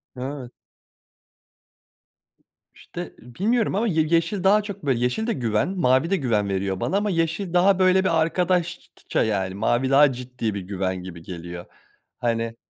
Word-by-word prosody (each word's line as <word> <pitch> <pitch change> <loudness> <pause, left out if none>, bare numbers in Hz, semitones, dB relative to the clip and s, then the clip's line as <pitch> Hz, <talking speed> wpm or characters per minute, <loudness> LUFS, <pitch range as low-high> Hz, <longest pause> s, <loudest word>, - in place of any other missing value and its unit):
Evet. 130 -1 -6 2.2
İşte - - -8
bilmiyorum 200 - -1
ama 225 +4 +1
ye 160 -5 +2
yeşil 170 +4 +1
daha 205 +2 +5
çok 200 -5 -8
böyle 130 -4 +1
yeşil 125 - -1
de 235 - +1
güven, 115 - 0
mavi 165 -5 +2
de 195 - +2
güven 105 - 0
veriyor 95 0 -2
bana 195 - 0
ama 205 +1 0
yeşil 165 +1 -1
daha 185 +2 +4
böyle 185 0 +4
bir 165 -4 +2
arkadaşça 175 +1 -1
yani 95 -4 -1
mavi 120 +5 +1
daha 140 +1 +6
ciddi 125 -3 -4
bir 100 - -4
güven 95 -1 -3
gibi 90 -2 -9
geliyor. 85 0 -8 0.5
Hani, 115 -1 -1
135 Hz, 150 wpm, -23 LUFS, 110-185 Hz, 2.2 s, daha